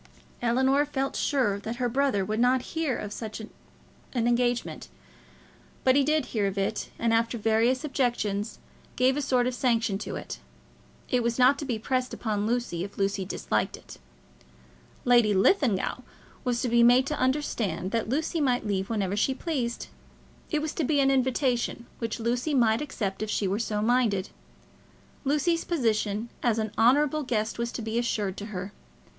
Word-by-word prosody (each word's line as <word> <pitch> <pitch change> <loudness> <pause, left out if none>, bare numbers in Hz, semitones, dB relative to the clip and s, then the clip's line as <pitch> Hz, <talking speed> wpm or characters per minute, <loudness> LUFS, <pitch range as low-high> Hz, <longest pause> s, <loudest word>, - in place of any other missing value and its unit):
Ellinor 260 +4 +3
felt 275 -2 -2
sure 245 -9 +1
that 220 +3 -5
her 245 0 0
brother 240 -5 +1
would 215 +2 -2
not 250 +1 +3
hear 320 -6 0
of 205 0 -5
such 220 -1 -6
an 220 - -8 0.7
engagement, 240 - 0 1.0
but 260 0 +4
he 280 - +5
did 305 -1 +1
hear 210 -4 +1
of 195 0 -4
it, 200 +2 -1
and, 230 -1 +1
after 230 +1 +1
various 225 +5 +2
objections, 235 -7 -1 0.4
gave 260 +1 +3
a 295 - -1
sort 255 -3 +2
of 250 - 0
sanction 230 -5 +1
to - - -5
it. - - -6 0.7
It 250 -2 +1
was 235 0 -1
not 260 +2 +5
to 290 - -4
be 245 -5 -1
pressed 255 +3 -1
upon 210 -2 -1
Lucy 235 -8 -1
if 200 - -8
Lucy 195 -1 0
disliked 185 - -2
it. - - -13 1.1
Lady 240 -4 +5
Linlithgow 235 - +2 0.4
was 245 -2 0
to - - +1
be 235 +1 +4
made 245 +2 +6
to 300 +2 -3
understand 240 - -1
that 230 -2 -1
Lucy 315 +4 0
might 250 -5 +1
leave 195 -2 -1
whenever 200 -4 -1
she 260 +6 +1
pleased. 255 -7 -2 0.6
It 305 -2 0
was 310 - -3
to 325 - -1
be 290 +1 +2
an 270 0 +4
invitation, 255 -2 0
which 230 -1 -3
Lucy 245 +6 0
might 230 -1 +3
accept 210 -10 -3
if 215 - -2
she 205 - 0
were 195 +3 -1
so 210 -2 -1
minded. 220 -5 +2 1.0
Lucy's 300 +4 +1
position 225 - 0
as 235 -3 +2
an 220 -2 -1
honourable 290 +6 +3
guest 225 -5 -2
was 235 0 -1
to 235 - -4
be 220 +2 -1
assured 210 -5 -1
to 205 - -6
her. 195 -1 -6
235 Hz, 175 wpm, -27 LUFS, 215-265 Hz, 1.1 s, made